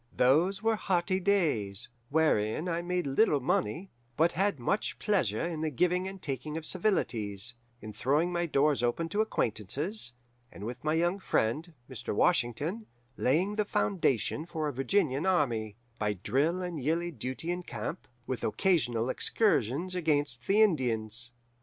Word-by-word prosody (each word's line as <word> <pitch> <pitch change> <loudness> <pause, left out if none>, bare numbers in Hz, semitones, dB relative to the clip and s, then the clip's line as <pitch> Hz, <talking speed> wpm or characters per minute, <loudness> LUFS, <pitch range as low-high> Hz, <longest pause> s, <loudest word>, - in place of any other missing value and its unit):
"Those 175 - +3
were 225 -1 +2
hearty 185 -1 +1
days, 145 - +1 0.2
wherein 155 -2 +2
I 170 -1 -1
made 180 -1 -1
little 145 +3 +3
money, 135 - -1 0.3
but 165 +3 +4
had 195 -4 0
much 195 - -1
pleasure 165 - +1
in 165 -2 -3
the 160 - 0
giving 180 +6 +1
and 190 0 -7
taking 145 0 -4
of 160 - -5
civilities, 120 - -1 0.3
in 110 0 -7
throwing 150 +10 +1
my 175 0 0
doors 145 -2 +2
open 125 +8 0
to 205 +5 +1
acquaintances, 135 - -1 0.4
and 100 - -10
with 120 +3 -6
my 155 +1 +1
young 175 +4 +1
friend, 160 - 0
Mr. 130 -5 -5
Washington, 165 - +1 0.3
laying 180 +11 +1
the 210 - +3
foundation 155 - 0
for 160 -3 -2
a 145 - -3
Virginian 145 +2 +1
army, 115 - +1 0.2
by 105 -1 +1
drill 145 - 0
and 175 -5 -4
yearly 170 +4 0
duty 130 +5 -4
in 180 +1 -2
camp, 120 -11 -6 0.2
with 130 -1 -4
occasional 120 - +1
excursions 170 - +1
against 145 -8 0
the 210 +3 +5
Indians. 120 - 0
155 Hz, 150 wpm, -30 LUFS, 120-180 Hz, 0.4 s, the